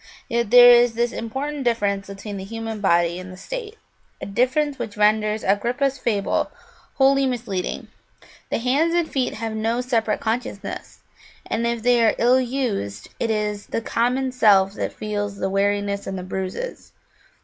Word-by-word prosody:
Yet 235 -2 -1
there 245 +1 +9
is 240 -1 +4
this 240 +1 +1
important 270 +5 -4
difference 205 -5 0
between 200 +1 -7
the 190 - -6
human 225 +1 -6
body 170 -2 +2
and 185 0 -9
the 185 - -11
state, 460 - -7 0.4
a - - -6
difference 260 +7 0
which 225 -4 -5
renders 215 0 +2
Agrippa's 245 +7 0
fable 210 -5 0 0.5
wholly 275 0 +4
misleading: 225 -7 -3 0.6
the - - 0
hands 280 +8 +1
and 345 -2 +2
feet 265 -4 -1
have 225 0 -4
no 225 +2 -1
separate 230 -4 0
consciousness, 220 -3 -4 0.4
and 235 +1 -1
if 235 -1 -2
they 245 -1 +4
are 220 - +3
ill 250 +2 +4
used 235 - -3
it 230 - -1
is 210 -1 -2
the - - -2
common 250 +3 0
self 200 -6 +4
that - - -3
feels 205 -1 -4
the 190 -1 -2
weariness 200 0 0
and 190 0 -4
the 180 - -5
bruises. 190 - -5
225 Hz, 160 wpm, -22 LUFS, 200-250 Hz, 0.6 s, there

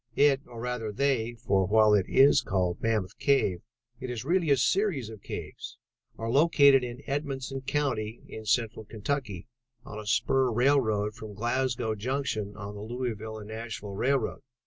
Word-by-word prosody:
"It, 140 -1 +4
or 120 -2 -10
rather 120 -2 -3
they, 120 -1 0
for 95 -4 +1
while 110 0 +5
it 100 -3 +3
is 135 +2 +6
called 90 -3 -1
Mammoth 110 -5 -1
Cave 115 -11 +2 0.4
it 130 - -6
is 120 0 -5
really 170 0 +1
a 140 - +5
series 150 - +1
of 110 -3 -11
caves, - - -7 0.4
are 115 0 -3
located 140 -2 +5
in 125 +3 -6
Edmonson 135 -2 -3
County 120 -7 -1
in 110 -1 -9
Central 110 0 0
Kentucky, 110 -3 -4 0.4
on 105 - -7
a 105 - -9
spur 130 +4 +2
railroad 110 -4 +2
from 105 -1 -9
Glasgow 120 0 -1
Junction 110 -3 -3
on 100 0 -7
the 105 - -8
Louisville 110 -1 -4
and 105 -1 -9
Nashville 110 -2 -6
Railroad. 130 +4 0
115 Hz, 160 wpm, -28 LUFS, 105-135 Hz, 0.4 s, is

